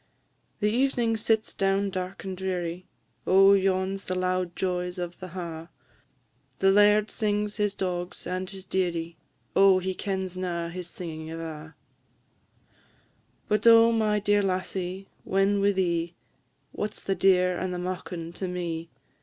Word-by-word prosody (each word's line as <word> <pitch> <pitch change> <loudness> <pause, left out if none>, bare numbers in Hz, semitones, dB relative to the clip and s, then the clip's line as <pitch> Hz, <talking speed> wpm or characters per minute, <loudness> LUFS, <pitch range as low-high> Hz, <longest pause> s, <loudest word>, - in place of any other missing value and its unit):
The 215 +5 +2
ev'ning 240 -4 +1
sits 220 0 0
down 195 0 +1
dark 185 0 -5
and 190 -1 -4
dreary; 180 -1 -3 0.4
Oh, 195 +1 +7
yon 190 0 +1
's - - -13
the 185 - -2
loud 185 -1 -1
joys 180 -1 -2
of 175 -1 -5
the 185 - -7
ha'; 170 -3 -6 0.9
The 195 0 +4
laird 210 +1 +5
sings 210 -1 -1
his 205 -1 0
dogs 180 -1 -3
and 185 0 -3
his 190 -1 -7
dearie 170 -3 -2 0.4
Oh, 195 -1 +6
he 185 0 -2
kens 190 -1 -3
na 175 -2 -3
his 180 0 -6
singin' 160 -3 -6
ava. 160 -1 -7 1.7
But 210 +2 +2
oh, 230 0 +8
my 215 -2 +2
dear 205 0 +2
lassie, 185 0 -3 0.2
when 195 +1 +2
wi' 200 +1 +4
thee, 170 -3 -1 0.6
What 210 - -4
's - - -9
the 195 - 0
deer 180 -2 +3
and 185 - -2
the 180 - -3
maukin 180 -2 -5
to 190 - -3
me? 170 -2 -4
185 Hz, 150 wpm, -27 LUFS, 180-200 Hz, 1.7 s, oh